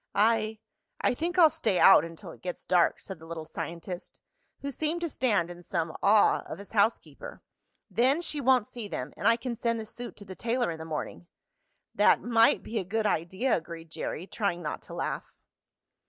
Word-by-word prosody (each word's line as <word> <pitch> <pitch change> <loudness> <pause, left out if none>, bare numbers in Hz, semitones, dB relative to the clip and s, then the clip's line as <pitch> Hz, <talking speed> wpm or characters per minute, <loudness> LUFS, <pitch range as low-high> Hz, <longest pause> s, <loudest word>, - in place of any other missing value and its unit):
"I 220 0 +2 0.4
I - - +2
think 340 +7 -3
I'll 325 -4 +7
stay 200 -5 0
out 195 -5 +8
until 165 +2 -8
it - - -15
gets 180 -1 -5
dark," 175 -2 +3
said 190 - -8
the 160 - -13
little 165 -1 -6
scientist, 170 +3 -7 0.4
who 280 - -3
seemed 315 +5 -2
to 340 - -1
stand 210 - +1
in 175 0 -10
some 165 -2 -3
awe 205 +1 +5
of - - -6
his 200 +1 -11
housekeeper. 225 - -1 0.4
"Then 260 +6 +2
she 300 -3 -1
won't 255 -3 +4
see 230 -2 -7
them, 130 -7 -5
and - - -1
I 230 - +6
can 240 0 -4
send 230 0 -1
the 220 - -5
suit 240 +3 -7
to 205 - -11
the 190 - -8
tailor 235 +1 -1
in 160 - -7
the 160 - -6
morning." 160 +2 -5 0.7
"That - - +5
might 230 -1 +3
be 225 - -3
a - - -2
good 215 +4 -1
idea," 190 +7 +1
agreed 165 -1 -7
Jerry, 165 - -4
trying 190 -4 -2
not 150 - -4
to - - -10
laugh. - - -3
210 Hz, 200 wpm, -28 LUFS, 170-240 Hz, 0.7 s, out